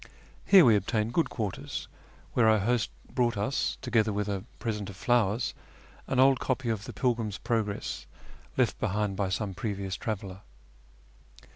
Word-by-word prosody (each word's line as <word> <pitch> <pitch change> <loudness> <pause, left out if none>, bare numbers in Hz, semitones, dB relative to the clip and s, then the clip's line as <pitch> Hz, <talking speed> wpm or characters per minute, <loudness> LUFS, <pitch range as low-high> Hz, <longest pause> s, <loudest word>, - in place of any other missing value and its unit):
Here 190 -5 +8
we 115 -3 +6
obtained 110 +3 0
good 165 - +2
quarters, 105 -5 -4 0.5
where 115 -2 +4
our 110 - +5
host 115 +3 +1 0.2
brought 120 -3 +1
us, 105 +7 0
together 115 -3 +2
with 105 0 -1
a 100 -2 -2
present 105 -3 -3
of 100 - -9
flowers, 115 +1 +1 0.5
an 130 - 0
old 135 0 +6
copy 130 -2 -1
of 105 -2 -2
the - - -6
Pilgrims 115 -5 -1
Progress 110 -3 -2 0.5
left - - +2
behind 105 0 0
by 95 -1 -1
some 100 +1 -2
previous 100 -1 -3
traveller. 100 -3 -5
110 Hz, 150 wpm, -29 LUFS, 100-120 Hz, 0.5 s, Here